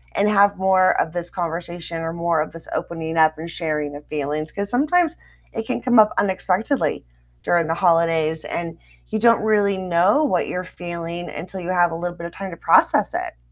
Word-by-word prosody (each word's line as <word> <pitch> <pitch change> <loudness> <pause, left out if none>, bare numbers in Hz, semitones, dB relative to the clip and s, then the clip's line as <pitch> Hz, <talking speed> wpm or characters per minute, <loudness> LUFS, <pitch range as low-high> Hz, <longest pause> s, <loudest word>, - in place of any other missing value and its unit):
and 205 +1 +2
have 200 -1 +4
more 190 -1 +3
of 160 - -3
this 175 0 -4
conversation 170 -1 -5
or 165 0 -3
more 170 -2 0
of 155 - -4
this 165 0 -9
opening 165 -1 -4
up 155 -1 +4
and 165 +2 -7
sharing 150 -4 -3
of 145 - -10
feelings," 150 +1 -3
'cause 200 0 -4
sometimes 320 +7 +2 0.4
it 225 -1 -4
can 250 - -3
come 245 -2 +2
up 210 - +6
unexpectedly 195 +7 0 0.4
during 170 -2 +2
the 165 - 0
holidays, 165 -3 +2
and 165 -1 -4 0.3
you 220 - -2
don't 230 0 +4
really 205 -3 +2
know 185 - +2
what 185 -12 +1
you're 180 0 -3
feeling 175 -1 -6
until 185 +2 -7
you 175 0 -6
have 175 -2 +3
a - - -4
little 175 +1 -4
bit 170 - -7
of - - -11
time 195 0 -7
to 170 - -9
process - - +3
it. - - -4
175 Hz, 200 wpm, -21 LUFS, 165-200 Hz, 0.4 s, up